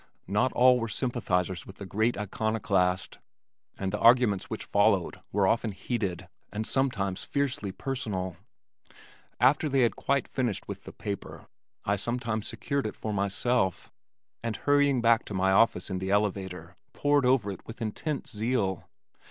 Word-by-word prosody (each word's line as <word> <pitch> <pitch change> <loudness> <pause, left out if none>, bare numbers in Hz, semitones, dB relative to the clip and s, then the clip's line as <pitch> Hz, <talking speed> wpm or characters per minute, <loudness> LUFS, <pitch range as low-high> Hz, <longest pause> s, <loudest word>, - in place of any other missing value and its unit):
Not 105 +7 +1
all 125 0 +6
were 115 - -2
sympathizers 95 -7 -1
with 95 - -10
the 100 - -8
great 110 +5 0
iconoclast, 100 -3 0 0.6
and 95 -1 -2
the - - -1
arguments 115 -5 +4
which - - -5
followed - - +2
were 100 -1 +2
often 115 0 +1
heated 95 -5 -3 0.2
and 110 +1 -3
sometimes 105 -9 0
fiercely 135 -8 -1
personal. 95 -6 -3 1.0
After 135 +6 +4
they 135 -1 +3
had 120 - +3
quite 140 -1 0
finished 120 -6 -2
with - - -7
the - - -8
paper, 100 -2 -6 0.4
I 100 +1 +1
sometimes 115 0 -2
secured 140 -5 -2
it - - -6
for 110 - -4
myself, 100 +1 0 0.5
and 115 -2 -2
hurrying 145 -3 +3
back 115 -1 +5
to 105 - -6
my 95 +1 +2
office 110 +1 +3
in 95 - -1
the 95 +1 -3
elevator 95 -4 -1 0.2
pored 145 -1 +2
over 120 -6 +3
it 95 - -9
with 115 +2 -9
intense 130 +7 -3
zeal. 105 -4 -1
110 Hz, 150 wpm, -28 LUFS, 95-125 Hz, 1.0 s, all